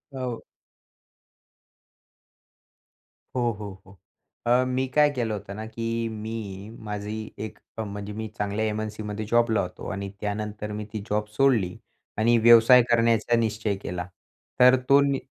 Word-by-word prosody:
हो. 125 Hz, -3 st, -4 dB, 2.9 s
हो, 125 Hz, -, +1 dB
हो, 100 Hz, -3 st, -8 dB
हो. 95 Hz, +1 st, -17 dB, 0.5 s
अ, 125 Hz, +2 st, +5 dB
मी 130 Hz, +1 st, 0 dB
काय 150 Hz, 0 st, +6 dB
केलं 120 Hz, -5 st, -1 dB
होतं 100 Hz, -1 st, -6 dB
ना, 110 Hz, +1 st, -6 dB
की 115 Hz, +1 st, -3 dB
मी 105 Hz, -2 st, -6 dB
माझी 105 Hz, +1 st, -5 dB
एक, 110 Hz, -, -10 dB, 0.2 s
अ, 110 Hz, -, -2 dB
म्हणजे 100 Hz, 0 st, -6 dB
मी 110 Hz, +1 st, -4 dB
चांगल्या 105 Hz, +1 st, -1 dB
एम-एन-सीमध्ये 110 Hz, 0 st, -3 dB
जॉबला 115 Hz, 0 st, +3 dB
होतो. 90 Hz, -1 st, -6 dB
आणि 100 Hz, 0 st, -4 dB
त्यानंतर 105 Hz, 0 st, -3 dB
मी 105 Hz, 0 st, -4 dB
ती 110 Hz, -, -2 dB
जॉब 105 Hz, +1 st, 0 dB
सोडली 115 Hz, -9 st, +2 dB, 0.4 s
आणि 115 Hz, +2 st, +4 dB
व्यवसाय 120 Hz, +2 st, +8 dB
करण्याचा 115 Hz, 0 st, +3 dB
निश्चय 110 Hz, -2 st, 0 dB
केला. 90 Hz, -1 st, -4 dB, 0.5 s
तर 125 Hz, +1 st, +8 dB
तो 140 Hz, 0 st, +8 dB
नी 140 Hz, -1 st, +1 dB
110 Hz, 135 wpm, -26 LUFS, 105-115 Hz, 2.9 s, व्यवसाय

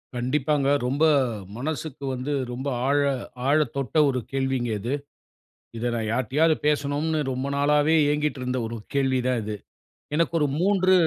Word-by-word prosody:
கண்டிப்பாங்க. 135 Hz, +3 st, +1 dB, 0.2 s
ரொம்ப 140 Hz, +5 st, 0 dB, 0.5 s
மனசுக்கு 145 Hz, +1 st, -4 dB
வந்து 130 Hz, +3 st, -3 dB, 0.2 s
ரொம்ப 130 Hz, +3 st, -4 dB, 0.2 s
ஆழ 145 Hz, -, +3 dB, 0.5 s
ஆழத்தொட்ட 145 Hz, -1 st, +1 dB
ஒரு 130 Hz, -2 st, 0 dB
கேள்விங்க 135 Hz, -3 st, -1 dB
இது. 120 Hz, +7 st, -2 dB, 0.8 s
இத 115 Hz, -, -3 dB
நான் 110 Hz, -2 st, -2 dB
யார்கிட்டயாவது 135 Hz, +7 st, +2 dB
பேசணும்னு 150 Hz, +2 st, +1 dB
ரொம்ப 130 Hz, +1 st, -3 dB
நாளாவே 150 Hz, +2 st, +3 dB, 0.2 s
ஏங்கிட்டிருந்த 140 Hz, -4 st, -1 dB
ஒரு 115 Hz, +1 st, -5 dB, 0.2 s
கேள்விதான் 130 Hz, -3 st, +1 dB
இது. 105 Hz, 0 st, -4 dB, 0.6 s
எனக்கு 165 Hz, +1 st, +1 dB
ஒரு 150 Hz, -, +2 dB
3 190 Hz, 0 st, +3 dB
140 Hz, 125 wpm, -25 LUFS, 125-150 Hz, 0.8 s, ஆழ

